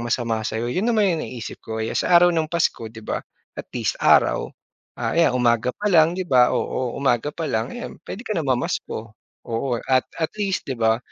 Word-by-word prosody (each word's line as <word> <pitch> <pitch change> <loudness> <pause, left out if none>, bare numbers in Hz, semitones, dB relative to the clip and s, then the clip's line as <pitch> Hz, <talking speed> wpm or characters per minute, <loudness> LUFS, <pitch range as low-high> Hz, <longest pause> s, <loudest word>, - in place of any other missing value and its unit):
masama 115 -1 -1
sa'yo. 115 +2 -2
'Yon 200 - 0
naman 210 -7 +3
yung 155 - -3
naiisip 120 -2 -7
ko, 110 0 -4
'yan - - -3
sa 175 - +4
araw 175 0 +6
ng 160 -2 0
Pasko 160 -9 0
'di 110 0 -12
ba, - - -2 0.4
at - - -7
least - - -2
araw. - - +4 0.5
Ah, - - -1
ayan 165 0 +4
umaga 120 0 +2
pa 210 - -4
lang 165 -5 +5
'di 185 - -2
ba 125 -4 +5
oo, 125 -2 -1
umaga 135 0 +1
pa 160 +1 -4
lang 110 +3 -1
ayan, 245 - -7
puwede 220 - -7
ka 215 - -2
na 165 - 0
mamasko. 115 -4 -2 0.3
Oo 120 +1 -1
at 130 -1 +3 0.2
at 160 - +1
least 200 -3 -2
'di 135 - -2
ba, 110 0 +3
130 Hz, 210 wpm, -23 LUFS, 115-170 Hz, 0.5 s, araw